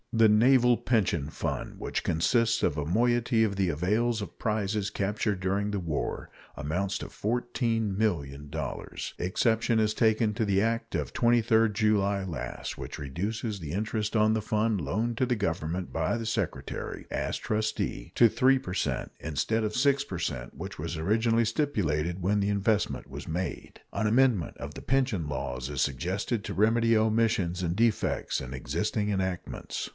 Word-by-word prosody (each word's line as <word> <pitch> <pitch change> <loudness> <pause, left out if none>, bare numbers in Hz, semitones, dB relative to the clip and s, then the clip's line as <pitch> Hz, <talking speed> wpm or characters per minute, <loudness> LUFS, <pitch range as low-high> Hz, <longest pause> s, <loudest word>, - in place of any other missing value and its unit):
The 115 -1 +6
naval 120 +3 +5
pension 90 - +1
fund, - - -4
which - - -2
consists 115 +8 +2
of - - +2
a 75 -2 -2
moiety 120 +4 +2
of 100 -3 0
the 95 -2 +1
avails 105 +9 +1
of 100 - -7
prizes 105 -2 0
captured 105 0 -1
during 100 +2 0
the 100 - -1
war, 80 -5 -3 0.3
amounts 90 +7 -1
to - - -6
$14,000,000. 105 - -2
Exception 110 +5 +2
is 110 -1 +2
taken 110 -1 +2
to 110 - -1
the 100 -2 +2
act 115 +1 -1
of - - -2
23d 115 -2 +3
July 100 -2 +2
last, 85 -6 -5
which - - -6
reduces 100 - -3
the 80 -4 -6
interest 105 +3 -2
on 110 0 +4
the 110 - 0
fund 105 -1 0
loaned 110 +11 -1
to 130 - +2
the 125 -1 +1
Government 85 -2 -2
by - - 0
the 115 - -4
Secretary, 110 - -3
as - - -2
trustee, 110 - -2
to 120 - +7
3 130 +5 +4
per 90 - -6
cent 90 - -1
instead 80 +9 -1
of 105 0 -2
6 140 +1 +3
per 90 -10 -5
cent, - - -4
which - - -7
was 85 +2 -3
originally 115 +7 +2
stipulated 90 - 0
when 100 +3 +2
the 100 - +1
investment 100 +1 0
was - - -8
made. 90 +2 -4
An 110 - 0
amendment 115 - +2
of - - -7
the - - -8
pension 125 - +1
laws 65 -2 -3
is 70 -2 -4
suggested 95 - -1
to - - -4
remedy 115 +2 +4
omissions 110 -5 +1
and 85 0 0
defects 115 -1 +1
in 65 -1 -6
existing 105 - -1
enactments. 95 -3 -3
105 Hz, 160 wpm, -28 LUFS, 90-115 Hz, 0.3 s, to